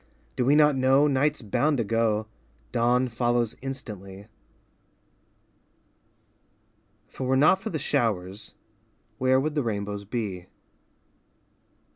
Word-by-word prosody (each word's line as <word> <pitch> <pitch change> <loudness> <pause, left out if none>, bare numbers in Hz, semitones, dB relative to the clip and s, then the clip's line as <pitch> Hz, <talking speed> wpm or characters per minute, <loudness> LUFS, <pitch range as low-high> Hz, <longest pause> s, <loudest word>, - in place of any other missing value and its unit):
Do 125 - 0
we 140 +3 +4
not 150 -1 +5
know, 135 +2 +4
Night's 145 0 +1
bound 140 +8 +1
to 115 - +1
go, 110 0 0 0.5
Dawn 125 +1 +2
follows 120 -1 0
instantly. 105 -8 -8 2.8
If - - -20
it - - -2
were 130 +1 +2
not 155 +7 +4
for 220 - -4
the 160 - -3
showers, 110 -8 -2 0.6
where 130 0 +3
would 150 +3 -1
the 150 - 0
rainbows 100 -3 -3
be? 100 -5 -4
125 Hz, 115 wpm, -26 LUFS, 105-135 Hz, 2.8 s, not